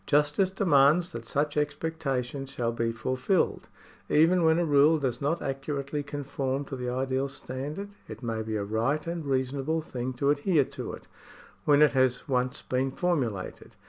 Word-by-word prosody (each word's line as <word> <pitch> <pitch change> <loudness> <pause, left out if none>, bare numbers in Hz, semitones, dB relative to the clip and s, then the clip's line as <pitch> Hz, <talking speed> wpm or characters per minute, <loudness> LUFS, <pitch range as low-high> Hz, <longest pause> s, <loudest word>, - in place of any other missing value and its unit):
Justice 150 +6 +3
demands 170 -2 +4
that 115 -6 -7
such 145 +3 0
expectations 145 -3 -2
shall 120 -4 -1
be 115 0 -1
fulfilled. 130 - 0 0.4
Even 170 +3 +4
when 160 0 +4
a 175 - +2
rule 150 +1 +5
does 130 -5 -2
not 145 +5 0
accurately 140 +1 -3
conform 140 -1 -3
to 135 - -6
the 125 -1 -3
ideal 130 +2 -1
standard, 140 +8 -6 0.2
it - - -9
may 115 -2 -2
be 110 0 -3
a 105 - -1
right 115 +9 0
and 170 -1 -3
reasonable 135 +4 0
thing 130 -4 -4
to 140 +3 +2
adhere 145 0 +2
to - - -6
it, - - -10 0.6
when 145 0 +6
it 150 - +5
has 130 -1 +1
once 125 -2 -1
been 130 +1 0
formulated. 130 - -2
140 Hz, 165 wpm, -28 LUFS, 130-150 Hz, 0.6 s, when